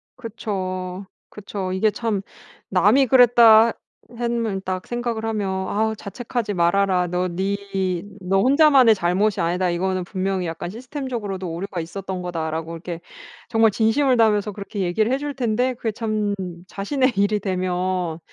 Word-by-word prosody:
그쵸, 190 Hz, -5 st, -5 dB, 0.2 s
그쵸. 200 Hz, -2 st, -5 dB
이게 210 Hz, +3 st, +2 dB
참 220 Hz, -3 st, -2 dB, 0.5 s
남이 210 Hz, +8 st, +4 dB
그랬다 235 Hz, -2 st, +7 dB, 0.4 s
했면 230 Hz, -4 st, -1 dB
딱 185 Hz, -1 st, -4 dB
생각을 240 Hz, -2 st, -3 dB
하면 215 Hz, -3 st, -1 dB, 0.2 s
"아우 220 Hz, +1 st, 0 dB
자책하지 220 Hz, +1 st, -4 dB
말아라. 180 Hz, +1 st, +2 dB
너 180 Hz, +1 st, -1 dB
니 190 Hz, +3 st, -2 dB, 0.6 s
너 190 Hz, +1 st, +1 dB
혼자만의 270 Hz, -3 st, +6 dB
잘못이 190 Hz, +3 st, +1 dB
아니다. 180 Hz, +2 st, 0 dB
이거는 185 Hz, +1 st, -1 dB
분명히 190 Hz, 0 st, -2 dB
약간 165 Hz, +1 st, -5 dB
시스템적으로도 230 Hz, -, -5 dB
오류가 180 Hz, +1 st, -4 dB
있었던 190 Hz, +2 st, -6 dB
거다."라고 165 Hz, -2 st, -3 dB
이렇게 170 Hz, 0 st, -6 dB, 0.5 s
정말 225 Hz, -1 st, +4 dB
진심을 235 Hz, +6 st, +2 dB
다하면서 210 Hz, -2 st, +2 dB
그렇게 200 Hz, +1 st, -7 dB
얘기를 195 Hz, +5 st, +1 dB
해 265 Hz, -, +2 dB
줄 290 Hz, +1 st, -4 dB
텐데 250 Hz, +1 st, 0 dB
그게 230 Hz, -2 st, -3 dB
참 215 Hz, -2 st, -1 dB, 0.3 s
자신의 255 Hz, +7 st, 0 dB
일이 205 Hz, +1 st, +2 dB
되면 185 Hz, -3 st, -2 dB
200 Hz, 325 characters per minute, -22 LUFS, 185-230 Hz, 0.6 s, 그랬다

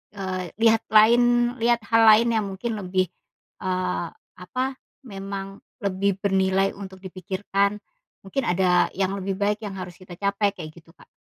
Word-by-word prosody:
eee, 185 Hz, -3 st, -4 dB
lihat 225 Hz, -1 st, +5 dB
lain 240 Hz, +2 st, +5 dB
lihat 235 Hz, 0 st, +2 dB
hal 225 Hz, 0 st, +5 dB
lain 220 Hz, +2 st, +7 dB
yang 205 Hz, -, -2 dB
mungkin 195 Hz, +5 st, -4 dB
lebih, 185 Hz, -1 st, 0 dB, 0.5 s
eee, 185 Hz, -2 st, -2 dB, 0.3 s
apa 255 Hz, +9 st, -3 dB, 0.4 s
memang 195 Hz, -2 st, -7 dB, 0.2 s
lebih 195 Hz, 0 st, 0 dB
bernilai 195 Hz, 0 st, +2 dB
untuk 190 Hz, -1 st, -9 dB
dipikirkan, 195 Hz, +2 st, -1 dB, 0.5 s
mungkin 265 Hz, +8 st, -3 dB
ada 180 Hz, 0 st, +3 dB
yang 190 Hz, 0 st, 0 dB
lebih 195 Hz, 0 st, -3 dB
baik 205 Hz, +1 st, +1 dB
yang 200 Hz, -, -5 dB
harus 180 Hz, -2 st, -7 dB
kita 185 Hz, -1 st, -12 dB
capai 200 Hz, 0 st, +1 dB
kayak 155 Hz, -3 st, -8 dB
gitu 165 Hz, -1 st, -17 dB
Kak, -, -, -20 dB
195 Hz, 150 wpm, -24 LUFS, 185-210 Hz, 0.5 s, lain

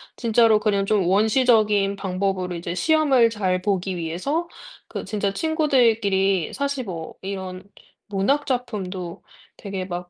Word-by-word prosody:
진짜로 225 Hz, -2 st, +3 dB
그냥 200 Hz, -2 st, +1 dB
좀 205 Hz, -3 st, +2 dB
원시적인 210 Hz, 0 st, +3 dB
방법으로 190 Hz, -1 st, -2 dB
이제 170 Hz, 0 st, -4 dB
시험을 275 Hz, -, +3 dB
잘 190 Hz, -5 st, -1 dB
보기 190 Hz, -2 st, -1 dB
위해서 185 Hz, -, -2 dB, 0.4 s
그 -, -, -6 dB
진짜 205 Hz, -2 st, -1 dB
친구들끼리 225 Hz, -, +2 dB
사실 280 Hz, -2 st, -2 dB
뭐 165 Hz, -5 st, -6 dB
이런 190 Hz, -1 st, -6 dB, 0.4 s
문학 210 Hz, +10 st, 0 dB
작품도 195 Hz, -, -4 dB, 0.4 s
되게 195 Hz, -2 st, -5 dB
막 175 Hz, -1 st, -6 dB
200 Hz, 275 characters per minute, -23 LUFS, 185-235 Hz, 0.4 s, 진짜로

